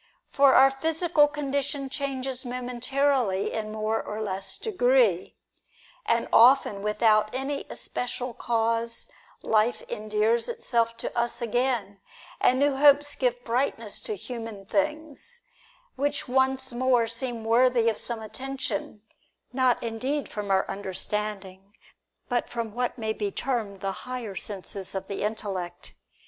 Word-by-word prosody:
For 280 -1 +5
our 270 +1 +7
physical 320 +2 +2
condition 285 -1 -2
changes 265 -2 -3
momentarily 250 -3 0
in 215 -1 -3
more 220 +1 -1
or 210 +1 -6
less 195 -2 -3
degree; 250 - +2 0.7
and 230 0 +2
often 235 -4 +6
without 215 0 +3
any 275 +2 -3
especial 250 0 -4
cause 230 0 -1 0.3
life 220 +2 +2
endears 215 - +1
itself 235 - 0
to - - -4
us 235 0 0
again, 235 -4 0 0.4
and 255 - +4
new 280 0 +2
hopes 290 0 +5
give 245 -1 -1
brightness 230 -3 -1
to 215 - -3
human 225 -2 -7
things, 305 - -2 0.5
which 290 +2 -1
once 265 0 +1
more 245 -1 +3
seem 235 0 -3
worthy 235 0 +4
of 225 - +1
some 230 -2 -5
attention, 235 -3 -5 0.5
not 255 -2 +2
indeed 255 +6 -2
from 205 -1 -5
our 190 0 +2
understanding, 195 0 -4 0.5
but 245 -1 -1
from 230 -3 -4
what 245 +1 -2
may 220 -2 -1
be 205 -2 -2
termed 215 -4 -3
the 195 - -1 0.2
higher 245 -5 -4
senses 195 -1 -4
of 190 0 -3
the 200 - -4
intellect. 190 -5 -4
235 Hz, 130 wpm, -27 LUFS, 215-265 Hz, 0.7 s, our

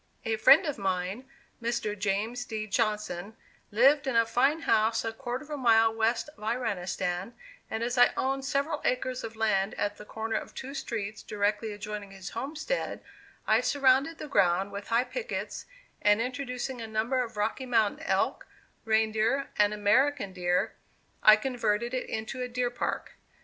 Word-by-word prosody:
A 225 - +1
friend 285 - +7
of 295 -7 -3
mine, 190 +6 -2 0.3
Mr. 235 -2 -1
James 210 +4 -1
D. 220 -3 -4
Johnson, 210 -2 -1 0.3
lived 275 +7 +4
in 265 - 0
a 230 0 +5
fine 270 +7 +2
house 220 -6 +2
a 225 - -2
quarter 250 +2 -4
of 300 - -14
a 295 - -2
mile 225 -3 +4
west 225 +4 +1
of 300 -7 -16
Iranistan, 200 -4 -2 0.4
and 220 +1 -2
as 245 +1 -1
I 245 - +8
owned 270 +1 0
several 280 +3 -1
acres 255 0 -1
of 225 0 -6
land 215 -3 +1
at 205 0 -2
the - - -10
corner 220 +1 -3
of - - -7
two 270 +1 -6
streets 220 -6 -4
directly 210 +1 -1
adjoining 210 -1 -6
his 195 -2 -9
homestead, 305 - -3 0.4
I 220 +2 +4
surrounded 275 +4 +3
the 305 - -7
ground 195 -5 +2
with 200 0 -7
high 235 +2 +3
pickets, - - -5 0.3
and 205 +1 +4
introducing 250 0 -3
a 225 - -5
number 225 +4 0
of 225 -3 -9
Rocky 225 +5 -1
Mountain 225 -4 +1
elk, - - 0 0.4
reindeer, 220 +4 +1
and 205 0 +5
American 210 +2 +2
deer, 180 0 0 0.5
I 215 - +9
converted 235 0 -1
it 255 - -3
into 220 +4 -4
a 250 - -2
deer 245 0 -1
park. 245 - -3
225 Hz, 165 wpm, -29 LUFS, 210-255 Hz, 0.5 s, I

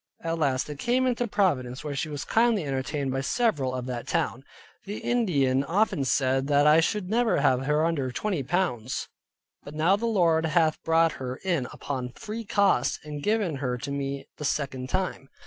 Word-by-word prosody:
At 165 0 -2
last 135 -4 +1
they 150 - -6
came 245 - +1
into 245 -1 0
Providence, 135 - 0
where 150 -2 -4
she 145 +3 -2
was 145 -1 -5
kindly 225 -6 +2
entertained 135 0 -2
by 135 +1 -1
several 140 - 0
of 125 -1 -4
that 125 -2 -5
town. 130 - -1 0.4
The 205 +2 -5
Indians 140 - +1
often 180 -5 +1
said 135 +1 +1
that 145 0 +4
I 150 +2 +7
should 185 +3 0
never 230 0 +2
have 130 -2 +2
her 150 +2 +2
under 150 -6 0
twenty 185 - -2
pounds. 135 -6 -1 0.5
But 145 - -10
now 165 +5 +3
the 230 +3 -2
Lord 165 -7 +3
hath 160 -1 +2
brought 165 0 +3
her 125 0 -3
in 170 -9 0
upon 125 -3 -5
free 225 0 -6
cost, 195 - +2
and 150 -1 -6
given 205 -5 0
her 125 -2 -2
to 135 +3 -6
me 140 -1 -3
the - - -7
second 135 -3 -2
time. 185 -6 -2
150 Hz, 185 wpm, -27 LUFS, 135-190 Hz, 0.5 s, I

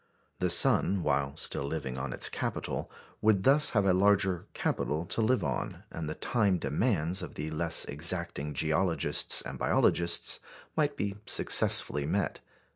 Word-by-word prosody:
The - - 0
sun, 95 -3 +3
while 70 -1 -1
still - - 0
living 70 -4 -5
on 65 0 -5
its - - +4
capital, - - -4 0.3
would 105 -3 +2
thus 145 +5 +6
have 100 - +2
a 95 - +3
larger 95 -2 +1
capital 80 +3 -2
to 115 - -1
live 125 +3 +1
on, - - -4
and 80 -2 -6
the 75 - -5
time 105 -7 0
demands 90 - 0
of - - -9
the 75 +1 -5
less 80 +1 0
exacting 75 -1 0
geologists 80 +4 0
and - - -8
biologists 85 0 +1 0.4
might 150 -2 -1
be 100 0 -4
successfully 70 0 +3
met. 95 -2 -2
85 Hz, 150 wpm, -29 LUFS, 75-100 Hz, 0.4 s, thus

